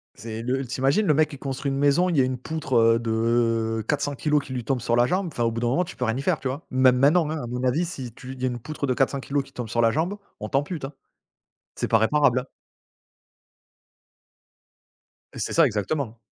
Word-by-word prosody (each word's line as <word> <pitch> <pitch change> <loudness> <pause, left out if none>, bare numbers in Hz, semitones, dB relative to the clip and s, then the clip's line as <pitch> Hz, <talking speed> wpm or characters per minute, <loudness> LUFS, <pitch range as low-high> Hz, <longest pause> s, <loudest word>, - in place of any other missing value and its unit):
C'est 110 +1 -6
le 130 +3 -1
tu 125 +1 -5
imagines 140 +11 +3
le 155 - +5
mec 155 +1 +3
qui 145 - -9
construit 135 +1 -3
une 135 - -2
maison, 145 +6 +3
il 170 - 0
y - - +6
a - - +4
une 130 0 -2
poutre, 135 0 -4
heu, 115 0 +5
de 115 -1 0
400kg 145 +1 0
qui 130 - -8
lui 125 -2 -3
tombe 130 -1 0
sur 120 0 +1
la 120 0 +4
jambe, 185 +7 0
enfin 120 - -2
au 115 - +2
bout 115 +1 -4
d'un 120 - +1
moment 135 +9 +2
tu 180 - -9
peux - - -4
rien 115 +1 0
y - - -2
faire, - - +1
tu 135 - -3
vois? 135 +4 -5
Même 130 -1 +4
maintenant, 150 +4 +4
hein, 160 - -2
à - - -5
mon 125 +1 -4
avis 135 +7 +1
si 130 -8 -6
tu 130 +3 -9
il 130 - -11
y - - +1
a - - +2
une 120 -1 -3
poutre 150 +3 -4
de 130 - +2
400kg 140 +2 0
qui 135 - -18
te - - -21
tombe 120 -3 -4
sur 115 +1 +1
la 115 -1 +4
jambe, 165 - -1 0.2
on 105 - -5
t'ampute 145 +2 -1
hein, 140 - -8 0.8
c'est - - -3
pas 115 - +4
réparable. 125 +2 +2 2.9
Et - - -8
c'est - - -2
ça, 165 - +6
exactement. 115 +1 -2
130 Hz, 245 wpm, -24 LUFS, 120-145 Hz, 2.9 s, y